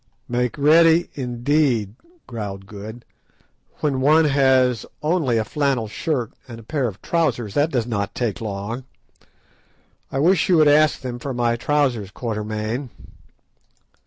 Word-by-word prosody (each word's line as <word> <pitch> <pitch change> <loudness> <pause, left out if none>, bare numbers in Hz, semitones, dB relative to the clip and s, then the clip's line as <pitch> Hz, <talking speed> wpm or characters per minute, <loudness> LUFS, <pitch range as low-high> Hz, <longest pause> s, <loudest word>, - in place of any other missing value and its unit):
"Make 125 +1 -1
ready, 165 +3 +5
indeed," 125 -4 0 0.3
growled 100 -5 -6
Good; 110 +3 -10 0.8
"when 140 -4 0
one 155 +4 +5
has 130 -4 +3 0.2
only 150 -7 +1
a 110 - 0
flannel 140 -6 0
shirt 125 +1 -3
and 115 -2 -9
a - - -12
pair 135 +2 -1
of 100 -4 -7
boots, 140 -11 0
that 145 +6 +2
does 125 -7 -1
not 100 -4 -3
take 115 -5 -2
long. 110 +4 -5 1.3
I - - -3
wish 165 +5 +3
you 180 - +5
would 155 -1 +5
ask 150 +1 +4
them 125 -2 -5
for 135 0 -5
my 120 -1 +1
trousers, 125 -5 0
Quatermain." 110 +3 -4
125 Hz, 135 wpm, -22 LUFS, 110-145 Hz, 1.3 s, ready